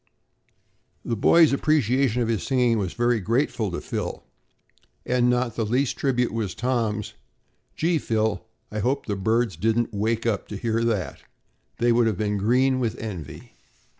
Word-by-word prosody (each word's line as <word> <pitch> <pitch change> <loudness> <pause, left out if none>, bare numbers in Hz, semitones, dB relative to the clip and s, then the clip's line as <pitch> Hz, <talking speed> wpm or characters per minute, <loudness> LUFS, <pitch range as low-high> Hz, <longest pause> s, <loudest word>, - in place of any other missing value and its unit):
The 115 - -1
boys' 160 +8 +5
appreciation 135 -4 +2
of - - -2
his 115 -5 0
singing 120 +1 +2
was 95 -4 -3
very 120 -1 +1
grateful 115 +1 0
to 90 - -4
Phil, - - -4 0.8
and 125 0 +2
not 125 -2 0
the 115 - -1
least 125 +5 0
tribute 125 -4 0
was 110 -5 -3
Tom's: 115 -4 -1 0.6
"Gee, 165 0 +1
Phil, 110 -4 -1 0.3
I 105 - -3
hope 125 +6 0
the 105 - -2
birds 110 +1 0
didn't 115 +4 0
wake 110 +3 -1
up 105 -5 -1
to 105 - -6
hear 115 +1 -1
that. 95 -11 -2 0.6
They 120 0 +2
would 115 0 +3
have 105 -5 -1
been 105 0 -1
green 130 +5 +2
with 115 -2 -1
envy." 95 -9 -8
115 Hz, 160 wpm, -24 LUFS, 105-125 Hz, 0.8 s, boys